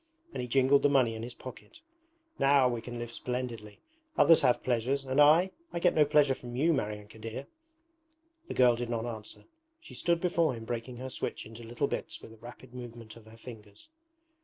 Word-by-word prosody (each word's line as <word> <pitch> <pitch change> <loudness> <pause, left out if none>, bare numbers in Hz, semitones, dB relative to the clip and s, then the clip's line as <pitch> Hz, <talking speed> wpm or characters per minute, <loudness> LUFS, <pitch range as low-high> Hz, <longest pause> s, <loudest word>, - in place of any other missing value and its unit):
and - - -3
he 125 - -4
jingled 135 +2 +4
the 145 - +4
money 130 -5 +3
in 110 - -6
his 120 +1 -7
pocket. 130 - -11 0.6
'Now 135 -1 +5
we 120 -2 -2
can 120 +1 -7
live 120 0 -5
splendidly. 120 -4 -5 0.4
Others 165 - +6
have 125 -3 +2
pleasures, 130 +3 0
and 135 +2 +2
I? 165 +6 +6 0.2
I - - -4
get 180 +1 +3
no 150 - +5
pleasure 145 -2 +4
from 120 -2 -9
you, 160 +6 +3
Maryanka 105 -3 -4
dear!' 115 +5 -6 1.0
The - - -5
girl 125 -2 +5
did 120 0 -4
not 115 -1 -2
answer. 110 -3 -7 0.4
She 315 - -14
stood 170 -1 +1
before 170 -5 +1
him 115 -1 -8
breaking 120 +1 -5
her 130 +1 -6
switch - - -4
into 115 +1 -11
little 115 +1 -2
bits - - -4
with 110 - -13
a - - -16
rapid 120 +1 -13
movement 120 -3 -9
of 115 -2 -15
her 110 +1 -14
fingers. 110 - -12
125 Hz, 200 wpm, -30 LUFS, 115-140 Hz, 1.0 s, Others